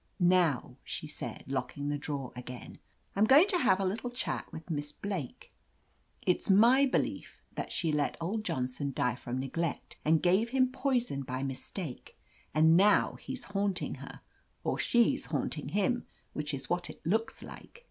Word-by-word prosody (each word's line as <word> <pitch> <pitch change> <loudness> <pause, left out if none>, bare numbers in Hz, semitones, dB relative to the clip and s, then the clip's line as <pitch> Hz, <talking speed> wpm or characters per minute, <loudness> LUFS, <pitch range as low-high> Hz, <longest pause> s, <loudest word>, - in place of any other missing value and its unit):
Now," 175 -8 +3
she - - -5
said, 150 - -5
locking 135 +2 -3
the 145 - 0
drawer 140 -3 -4
again, 125 0 -8 0.4
I'm 205 +2 +4
going 280 +9 +8
to 365 -4 +3
have 190 - +4
a 195 - +1
little 215 +6 -2
chat 245 +1 -3
with 160 +2 -8
Miss 145 -1 -2
Blake. 190 -10 -5 0.7
It's 180 - +1
my 240 +8 +6
belief 260 - -2
that - - -4
she 165 -3 0
let 150 -1 0
old 200 +6 -2
Johnson 140 -4 -2
die 125 -1 +1
from 125 +1 -4
neglect, 155 +4 -3
or 155 - +3
gave 185 +8 +3
him 255 0 +2
poison 250 - 0
by 130 0 -4
mis 135 -1 -4
take. 165 -11 -7 0.3
And 160 +2 +5
now 200 +3 +5
he's 260 -2 -6
haunting 200 -2 -1
her - - -10 0.2
— - - -41
or - - -1
she's 235 -1 +3
liaunting - - -2
him, 240 +4 0 0.3
which 150 0 -3
is 140 -2 -5
what 175 0 -1
it - - -11
looks 220 +7 0
like." - - -11
175 Hz, 170 wpm, -31 LUFS, 140-215 Hz, 0.7 s, going